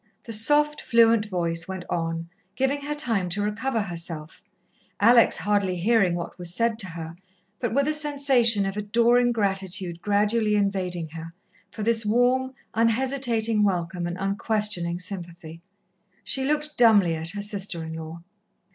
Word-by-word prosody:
The 230 - -5
soft, 295 +7 +3
fluent 230 -3 +3
voice 170 -3 -2
went 190 -1 -6
on, 165 0 -3 0.3
giving 270 +2 0
her 295 +1 -4
time 225 -10 -1
to 200 +4 -2
recover 225 +3 -1
herself, 165 -4 -7 0.6
Alex 235 +2 +5
hardly 200 -3 0
hearing 195 -1 +2
what 175 +1 -6
was 175 0 -2
said 230 -1 0
to 195 - 0
her, 165 -1 -8 0.4
but 240 - -2
with 280 +3 +1
a 305 - +1
sensation 275 -8 +2
of 195 0 -3
adoring 235 +4 +2
gratitude 190 -5 -2
gradually 210 +2 +1
invading 185 -5 -1
her, 165 +1 -9 0.3
for 215 - -7
this 225 0 +2
warm, 250 +4 +1 0.2
unhesitating 230 -1 +1
welcome 175 -2 -1
and 175 +1 -5
unquestioning 195 -3 -1
sympathy. 175 -3 -7 0.6
She 265 -1 +1
looked 300 0 -2
dumbly 205 -8 +5
at 160 +1 -3
her 205 - -4
sister 195 -5 -3
in 160 0 -7
law. 160 +1 -8
205 Hz, 145 wpm, -25 LUFS, 175-235 Hz, 0.6 s, Alex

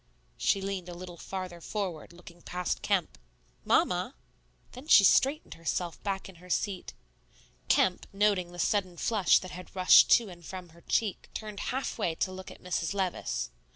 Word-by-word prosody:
She 195 - +1
leaned 190 -2 -4
a 175 - -7
little 175 -1 -9
farther 185 -3 -6
forward, 185 -6 -4
looking 175 0 -14
past 180 0 -3
Kemp. - - 0 0.4
"Mamma!" - - +2 0.6
Then 255 +4 -11
she 205 - +8
straightened 275 - +3
herself 165 +1 -3
back 195 -2 -3
in 190 -3 -13
her 180 - -14
seat. 190 0 -2 0.7
Kemp, 180 -1 +2
noting 195 -3 +1
the 175 - -11
sudden 185 0 0
flush 210 -2 +3
that 185 - -5
had 180 +1 -10
rushed 185 -1 +7
to 235 - +4
and 175 -1 -12
from 180 +1 -8
her 170 +1 -18
cheek, 210 +3 -1
turned 210 -2 -6
halfway 225 -9 -2
to 185 - -1
look 185 0 -8
at - - -14
Mrs. 180 0 -2
Levice. 115 - -2
185 Hz, 165 wpm, -29 LUFS, 175-200 Hz, 0.7 s, she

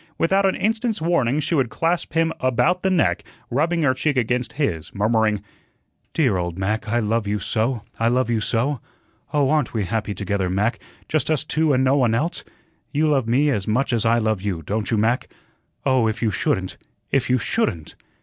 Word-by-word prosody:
Without 195 +3 +3
an 190 - +1
instant's 225 0 0
warning, 155 -5 +1
she 155 +3 -1
would 135 -7 +2
clasp 165 +2 -1
him 165 0 +2
about 130 +9 +2
the 190 - +1
neck, 145 - +2 0.3
rubbing 165 +6 +1
her 130 -3 +4
cheek 140 +2 -1
against 125 +1 0
his, 85 - -2
murmuring: 105 0 +1 0.7
"Dear 130 - +2
old 85 -1 -3
Mac, 105 +4 -1
I 115 +3 0
love 115 -1 0
you 105 +1 0
so, 110 +3 -1 0.2
I 115 - +2
love 125 +2 +2
you 115 -2 0
so. 120 +3 0 0.5
Oh, 145 -2 +2
aren't 150 -6 0
we 105 -3 0
happy 105 0 -2
together, 100 -2 -1
Mac, 105 +6 0 0.3
just 155 0 0
us 155 -3 +1
two 155 0 +1
and 130 -1 +3
no 135 +2 +3
one 120 -4 +3
else? 155 +8 -1 0.5
You 155 +2 +2
love 135 -6 +1
me 140 +5 +3
as 105 -7 -2
much 125 +4 +1
as 115 - +1
I 115 +1 +3
love 110 -4 0
you, 95 -5 -3
don't 105 +6 -2
you, 115 - +1
Mac? 115 +4 +1 0.6
Oh, 130 -4 +3
if 110 +2 -2
you 110 - +2
shouldn't 105 - -1 0.3
if 135 -3 +1
you 130 - +4
SHOULDN'T." 110 - -1
125 Hz, 195 wpm, -22 LUFS, 110-150 Hz, 0.7 s, her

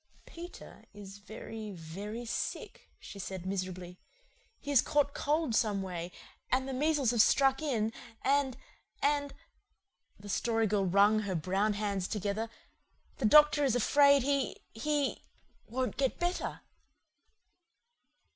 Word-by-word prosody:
"Peter 345 +1 -11
is 200 -1 -10
very, 220 +1 -8
very 200 +8 -7
sick," 230 - -5
she 200 - -10
said 190 -1 -6
miserably. 185 -2 -4 0.6
"He 285 - -5
has 275 - +6
caught 290 -2 +1
cold 300 -3 0
someway 190 -6 -1 0.4
and 260 +1 +1
the 270 - -4
measles 285 -2 +2
have 235 -2 +4
struck 270 +4 +4
in 225 -7 -1 0.3
and 275 -1 +2 0.5
and 285 -1 +1 0.4
" 185 -9 -41
the 205 - -11
Story 225 +3 +1
Girl 200 -2 +1
wrung 200 +4 +4
her 200 -3 -2
brown 190 +6 0
hands 200 -2 -2
together 210 +2 -2 0.7
"the 255 - -1
doctor 295 +4 +6
is 260 -4 +2
afraid 280 +3 +5
he 280 -1 0 0.2
he 290 +4 -1 0.5
won't 255 +2 -2
get 270 -2 0
better." 350 +1 -2
225 Hz, 125 wpm, -31 LUFS, 200-280 Hz, 0.7 s, has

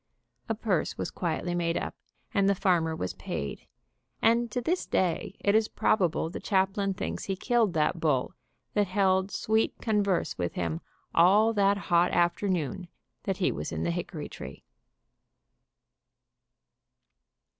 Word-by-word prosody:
A 225 - +1
purse 200 -7 -1
was - - -3
quietly 175 0 -2
made 170 -1 0
up - - -3 0.4
and 200 -1 +3
the 200 - +3
farmer 170 -4 +2
was 90 - -3
paid, 70 -6 -5 0.5
and 235 +1 +3
to 250 - -2
this 340 +9 -1
day 185 +1 0
it 200 - +3
is 220 0 +4
probable 180 -6 +1
the 165 - -6
chaplain 195 0 +1
thinks - - -4
he 195 - -1
killed 225 -1 +1
that 160 +1 +1
bull 150 0 +1 0.4
that 205 -1 +2
held 190 0 +2
sweet 220 +2 +1
converse 205 - 0
with 85 -1 -1
him 85 -2 -2 0.3
all 205 +7 +5
that 200 -1 +3
hot 175 -2 +2
afternoon 175 -1 0 0.4
that 195 -2 -1
he 190 - +2
was 75 +2 -4
in 80 0 -3
the 85 - 0
hickory - - -4
tree. - - -9
185 Hz, 145 wpm, -28 LUFS, 165-205 Hz, 0.5 s, all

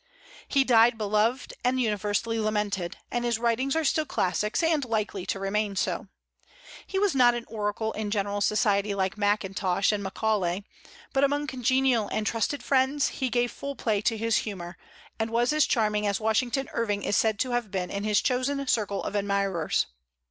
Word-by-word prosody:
He 275 -2 +3
died 235 -2 +5
beloved 215 +4 0
and 255 +1 +1
universally 215 0 0
lamented, 210 -5 -1
and 240 0 -1
his 235 -2 +1
writings 240 +4 0
are 320 - +1
still 310 +2 +1
classics, 210 - 0
and 320 -3 +2
likely 215 -5 -2
to - - -1
remain 200 +1 -1
so. 200 +3 -1 0.8
He 385 - -3
was 400 -1 +2
not 245 -3 +5
an 240 - -5
oracle 215 0 -2
in 215 -1 -4
general 205 -1 -1
society, 205 -1 +2
like 190 -1 -1
Mackintosh 200 -2 +1
and 210 -1 -1
Macaulay; 195 -2 -1 0.5
but 270 - +2
among 290 +1 +2
congenial 260 -3 +1
and 215 - -2
trusted 230 +4 -1
friends 270 +2 +2
he 260 -2 -2
gave 240 0 +1
full 280 0 -6
play 215 -5 0
to 225 +1 0
his 225 +1 +1
humor, 175 -5 -5 0.4
and 220 0 0
was 240 +4 +1
as 305 -1 +3
charming 210 -3 +1
as 200 -1 0
Washington 240 +4 0
Irving 205 -3 -1
is - - 0
said 220 -2 +2
to 255 +4 -1
have 240 -3 -1
been 185 -2 -3
in 200 0 -3
his 210 -1 +2
chosen 275 +2 0
circle 210 -5 0
of - - -4
admirers. 200 -4 0
220 Hz, 175 wpm, -27 LUFS, 205-250 Hz, 0.8 s, died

